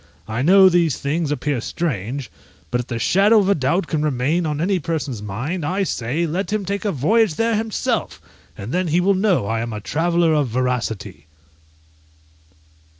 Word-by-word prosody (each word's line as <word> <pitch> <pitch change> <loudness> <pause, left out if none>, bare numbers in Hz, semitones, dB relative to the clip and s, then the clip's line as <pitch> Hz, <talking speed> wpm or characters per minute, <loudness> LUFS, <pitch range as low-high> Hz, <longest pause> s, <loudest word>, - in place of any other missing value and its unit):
I 110 +2 -2
know 190 +6 +7
these 170 -5 +2
things 150 +2 -2
appear 145 -3 -1
strange; 130 - -3 0.4
but 125 0 +1
if 120 - -12
the 120 - -3
shadow 200 - +4
of 200 -2 +3
a - - +5
doubt 160 +4 0
can 155 -2 -2
remain 150 +4 0
on 150 -1 -2
any 185 +3 +1
person's 150 -8 -3
mind, 125 - -4
I 185 +7 0
say, 145 0 -2
let 180 +6 -3
him 210 -2 -1
take 200 +3 -3
a 205 - +1
voyage 195 - +2
there 230 +3 +1
himself, 220 0 -2 0.4
and 100 +5 -6
then 180 0 0
he 165 +2 +2
will 195 +3 +3
know 190 - +1
I 115 +2 -1
am 115 -1 -4
a 105 - -4
traveller 165 +7 +1
of 150 -3 +2
veracity. 120 - -3
160 Hz, 180 wpm, -21 LUFS, 125-185 Hz, 0.4 s, know